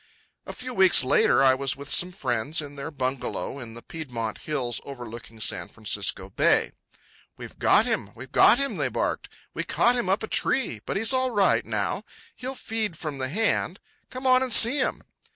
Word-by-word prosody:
A - - -6
few 255 0 -6
weeks 190 - +6
later 130 0 +3
I 130 -1 +6
was 135 0 -1
with 140 +1 -6
some 180 +1 +4
friends 140 -1 -2
in 145 -2 -6
their 140 +2 -6
bungalow 135 -1 -4
in 115 -3 -9
the 120 - -10
Piedmont 120 -9 -6
hills 130 -6 -3
overlooking 120 -4 -10
San - - -2
Francisco - - -1
Bay. - - +2 0.7
"We've - - -11
got - - +4
him, 100 - -2
we've 130 +2 -11
got 235 - +6
him," 275 0 -1
they - - 0
barked. - - -3 0.2
"We - - -3
caught 245 - +2
him 240 -6 -1
up 195 +3 +1
a - - -3
tree; 210 - 0
but - - -2
he's 225 +6 +2
all 260 0 +2
right 205 -5 +2
now, - - -3 0.3
he'll 260 +2 -6
feed 220 -8 -4
from 150 -4 -5
the 130 0 -2
hand. 220 +9 -1 0.3
Come 255 +1 -7
on 255 0 +5
and 260 -1 -2
see 235 +5 +7
him." 255 - -1
155 Hz, 190 wpm, -25 LUFS, -, 0.7 s, see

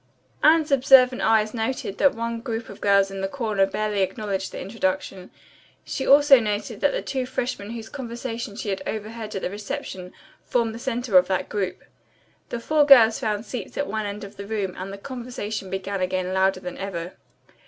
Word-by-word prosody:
Anne's 310 -1 +5
observant 260 -1 +6
eyes 215 -1 +3
noted 225 -3 -3
that 280 - +4
one 230 0 -3
group 230 -2 -4
of 200 - -11
girls 200 -1 +4
in 195 0 -5
the 195 - 0
corner 210 -4 0
barely 210 0 -1
acknowledged 195 0 -2
the - - -7
introduction. 190 -2 -3 0.6
She 265 - -3
also 285 -1 +7
noted 210 -2 -3
that - - +3
the - - -3
two 260 -2 -2
freshmen 245 -5 -3
whose 225 -1 -6
conversation 235 -4 -6
she 220 -1 -4
had 195 - -2
overheard 220 0 -5
at 195 - -4
the - - -1
reception 190 -3 -6 0.3
formed 230 -2 0
the 230 - -8
center 240 -6 +3
of 180 - -1
that 190 -1 -1
group. 195 -3 -3 0.7
The 240 - -3
four 305 +5 +3
girls 240 -6 +7
found 215 0 -2
seats 230 -3 -6
at 285 - 0
one 215 -4 -3
end 205 +1 -6
of 200 - -10
the 200 0 -7
room 200 -4 -2
and 190 +1 -6
the 200 - -7
conversation 225 -4 -6
began 190 +1 -3
again 185 0 -1
louder 190 0 +2
than 180 -1 -7
ever. 180 -3 -5
215 Hz, 190 wpm, -24 LUFS, 195-245 Hz, 0.7 s, also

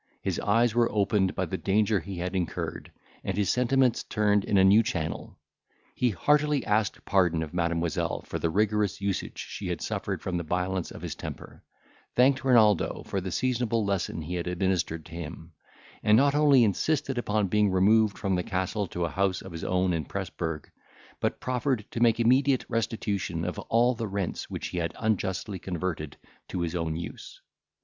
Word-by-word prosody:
His - - -1
eyes 115 +2 +2
were 120 0 +2
opened 100 -2 +1
by - - 0
the - - -4
danger 105 +1 +2
he 95 -1 -7
had 90 +2 -3
incurred, 90 -3 -3 0.3
and 95 0 -3
his 100 -2 +2
sentiments 125 0 +2
turned 105 -2 +1
in 100 - +1
a 95 - +6
new 100 +4 +7
channel. 85 -9 -4 0.6
He 125 - +1
heartily 145 - +2
asked 105 -1 0
pardon 90 -4 +2
of 80 - -8
Mademoiselle 85 -1 -1
for - - -5
the 85 - 0
rigorous 105 +1 +1
usage 100 -1 -3
she - - -6
had - - -2
suffered - - -3
from 90 -2 -2
the 85 - -2
violence 90 +2 -1
of - - -10
his - - -3
temper; - - -9 0.5
thanked 135 +2 +4
Renaldo 110 -8 +3
for 95 - -3
the 95 0 -5
seasonable 115 +1 0
lesson 95 -4 -2
he 85 +4 -5
had 90 -1 -3
administered 90 -3 -1
to - - -14
him; 85 0 -8 0.5
and 105 +1 +5
not 140 +2 +4
only 145 -4 +5
insisted 130 - 0
upon 105 -3 0
being 105 +2 +3
removed 105 +3 +3
from 95 -2 -1
the 90 - +1
castle 95 +3 -2
to 85 0 -2
a - - -2
house 95 -1 0
of - - -9
his 85 -1 -7
own 90 0 +1
in 80 -3 -2
Presburg, 80 0 -4 0.5
but - - -1
proffered 130 -3 -1
to - - -4
make 115 -1 +4
immediate 130 +3 +3
restitution 105 -7 -2
of 90 - -3
all 120 +2 +2
the 115 -2 -4
rents 100 -2 -3
which - - -4
he 90 - -3
had 85 -1 -2
unjustly 100 -2 -1
converted 85 -4 -4 0.3
to 90 - -3
his 85 0 -2
own 85 -2 -2
use. 85 - -8
100 Hz, 185 wpm, -27 LUFS, 90-115 Hz, 0.6 s, new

